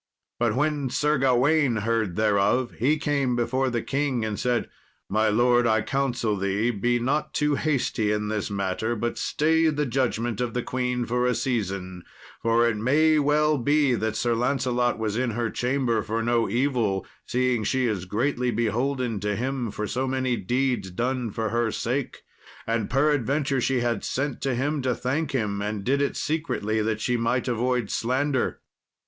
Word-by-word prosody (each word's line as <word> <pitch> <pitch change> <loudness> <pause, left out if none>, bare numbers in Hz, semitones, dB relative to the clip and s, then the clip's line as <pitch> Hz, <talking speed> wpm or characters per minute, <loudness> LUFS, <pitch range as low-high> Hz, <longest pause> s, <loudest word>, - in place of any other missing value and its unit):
But 115 -2 +1
when 145 -1 0
Sir 150 +2 +1
Gawain 135 +1 +3
heard 110 -3 0
thereof, 110 +4 +2
he 140 +7 +3
came 140 -5 0
before 130 +2 0
the 120 -2 -2
king, 135 -5 -1
and 105 -2 -3
said, 125 -1 0 0.4
"My 110 +2 +2
lord, 120 +2 +3
I 110 -1 +2
counsel 125 -6 0
thee 100 +4 0
be 120 +3 +1
not 135 +6 -1
too 150 0 +2
hasty 130 -8 0
in 105 0 -1
this 105 -1 -2
matter, 100 +3 -1
but 120 +1 -3
stay 160 +2 +2
the 150 -1 0
judgment 120 -3 -1
of 120 -2 -2
the 125 - -1
queen 125 -1 -1
a 125 +1 +1
season, 95 -8 -2 0.4
for 115 +1 +3
it 110 -2 0
may 155 +7 +3
well 150 0 +2
be 145 +1 +3
that 110 -1 -1
Sir 120 +1 +1
Lancelot 125 0 0
was 110 -1 -2
in 125 0 0
her 115 -2 -1
chamber 125 -3 0
for 115 +2 -2
no 115 -1 +1
evil, 120 -5 0 0.2
seeing 125 -2 +1
she 130 +3 +1
is 105 -6 -1
greatly 125 +5 0
beholden 120 +1 -1
to 105 +1 -1
him 125 +1 -2
for 105 +1 -4
so 130 +5 -2
many 130 -1 0
deeds 125 0 -1
done 120 +5 -2
for 110 +1 -2
her 115 +1 0
sake, 125 +5 -3 0.4
and 115 -2 -1
peradventure 140 -1 +1
she 130 0 +1
had 120 -3 -1
sent 135 0 -2
to 135 -2 0
him 145 +4 -1
to 125 -2 0
thank 140 +4 -1
him, 105 -6 -1
and 105 -1 -3
did 140 +6 +1
it 140 - -1
secretly 130 -9 -1
that 110 0 -1
she 125 -1 +1
might 120 +2 0
avoid 125 -1 0
slander." 130 +2 0
120 Hz, 170 wpm, -25 LUFS, 110-135 Hz, 0.4 s, Gawain